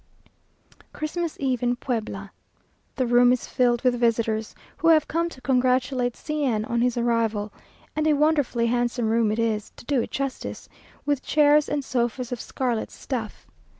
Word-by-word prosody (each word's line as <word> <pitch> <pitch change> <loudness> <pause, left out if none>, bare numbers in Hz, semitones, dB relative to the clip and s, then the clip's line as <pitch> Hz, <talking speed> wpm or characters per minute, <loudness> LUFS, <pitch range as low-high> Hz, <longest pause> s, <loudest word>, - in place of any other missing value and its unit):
Christmas 325 +1 -3
eve 260 -3 0
in 245 0 +1
Puebla! 215 -6 -4 0.6
The 260 - 0
room 245 +1 +5
is 250 - 0
filled 245 -1 +1
with 245 -2 +2
visitors, 225 -2 0 0.2
who 330 - 0
have 315 -2 +5
come 335 +2 0
to 270 - -13
congratulate 255 -1 +1
C 305 -1 -3
n 220 -5 0
on 235 +1 -1
his 245 0 +1
arrival, 225 -3 0 0.4
and 310 0 +1
a 310 - +5
wonderfully 290 -5 +2
handsome 240 -1 0
room 225 -2 +2
it 215 - -1
is, 220 -2 -1
to - - -14
do 270 -2 +1
it - - -4
justice, 275 -1 -4 0.4
with 285 -2 +1
chairs 300 0 +4
and 290 -2 -2
sofas 245 0 -1
of 245 - -3
scarlet 245 -4 -2
stuff. 235 -5 -6
245 Hz, 165 wpm, -25 LUFS, 230-280 Hz, 0.6 s, room